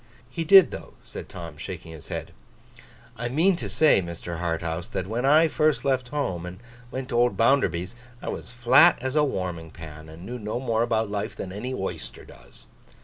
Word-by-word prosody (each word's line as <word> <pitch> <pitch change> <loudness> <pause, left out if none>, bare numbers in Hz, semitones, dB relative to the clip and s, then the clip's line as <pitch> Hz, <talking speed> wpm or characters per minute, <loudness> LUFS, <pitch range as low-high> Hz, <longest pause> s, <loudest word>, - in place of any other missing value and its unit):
'He 165 - -2
did, 190 +2 +8
though,' - - -9
said - - -9
Tom, 85 -3 -8
shaking 85 +1 -7
his 80 -3 -11
head. - - -5 0.9
'I 120 +1 -3
mean 170 +9 +3
to - - -4
say, 155 -10 +4
Mr. 85 -1 -6
Harthouse, 85 0 -2
that 95 - -3
when 115 +6 -2
I 155 +3 +6
first 150 -5 +1
left 130 -2 +1
home 120 - -2
and 90 +1 -8 0.3
went 130 0 -5
to 120 - -3
old 120 0 +2
Bounderby's, 115 - +2 0.2
I - - -5
was - - -5
as - - -9
flat 120 -1 +6
as 130 +2 -3
a 150 - +4
warming 90 - -3
pan, 80 -1 -11
and 80 +3 -11
knew 125 +3 -6
no 105 +2 -3
more 115 -3 0
about 110 -3 0
life, 100 -1 -3
than 95 - -6
any 105 +7 -5
oyster 95 - -5
does. - - -15
110 Hz, 200 wpm, -25 LUFS, 85-130 Hz, 0.9 s, did